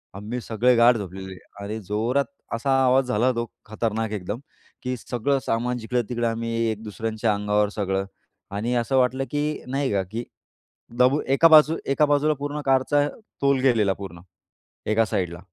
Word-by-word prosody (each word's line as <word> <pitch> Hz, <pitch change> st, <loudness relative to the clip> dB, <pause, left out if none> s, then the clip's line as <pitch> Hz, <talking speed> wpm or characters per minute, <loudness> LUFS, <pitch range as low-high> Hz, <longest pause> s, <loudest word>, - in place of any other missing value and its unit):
आम्ही 105 Hz, +5 st, -5 dB
सगळे 120 Hz, +3 st, +2 dB
गाढ 120 Hz, +1 st, +6 dB
झोपलेले 95 Hz, -1 st, -7 dB, 0.3 s
आणि 105 Hz, +2 st, -4 dB
जोरात 115 Hz, +8 st, 0 dB, 0.3 s
असा 115 Hz, +4 st, -3 dB, 0.2 s
आवाज 130 Hz, +1 st, +4 dB
झाला. 125 Hz, +2 st, +2 dB
तो 115 Hz, -1 st, -2 dB, 0.2 s
खतरनाक 110 Hz, 0 st, -2 dB
एकदम, 105 Hz, +2 st, -4 dB, 0.4 s
की 125 Hz, 0 st, -2 dB
सगळं 125 Hz, +4 st, -1 dB
सामान 120 Hz, +2 st, 0 dB
जिकडं-तिकडं. 120 Hz, 0 st, -1 dB
आम्ही 115 Hz, 0 st, -2 dB, 0.2 s
एक-दुसऱ्यांच्या 110 Hz, +1 st, -2 dB
अंगावर 105 Hz, 0 st, +1 dB
सगळं. 95 Hz, -2 st, -1 dB, 0.5 s
आणि 110 Hz, +5 st, -2 dB
असं 120 Hz, +3 st, +1 dB
वाटलं 130 Hz, +1 st, +2 dB
की 145 Hz, -1 st, 0 dB, 0.3 s
नाही 135 Hz, +1 st, -1 dB
का, 100 Hz, -1 st, +1 dB
की 110 Hz, +6 st, -5 dB, 0.8 s
दबून 130 Hz, +4 st, +4 dB
एका 165 Hz, -, +7 dB
बाजूला 155 Hz, 0 st, +6 dB
एका 150 Hz, +2 st, +4 dB
बाजूला 145 Hz, +1 st, +3 dB
पूर्ण 145 Hz, +1 st, -3 dB
कारचा 135 Hz, +2 st, +3 dB, 0.3 s
तोल 140 Hz, -1 st, +3 dB
गेलेला 115 Hz, -7 st, +3 dB
पूर्ण, 95 Hz, -4 st, -9 dB, 0.7 s
एका 110 Hz, +1 st, +3 dB
साईडला. 90 Hz, -4 st, -2 dB
115 Hz, 150 wpm, -24 LUFS, 105-130 Hz, 0.8 s, एका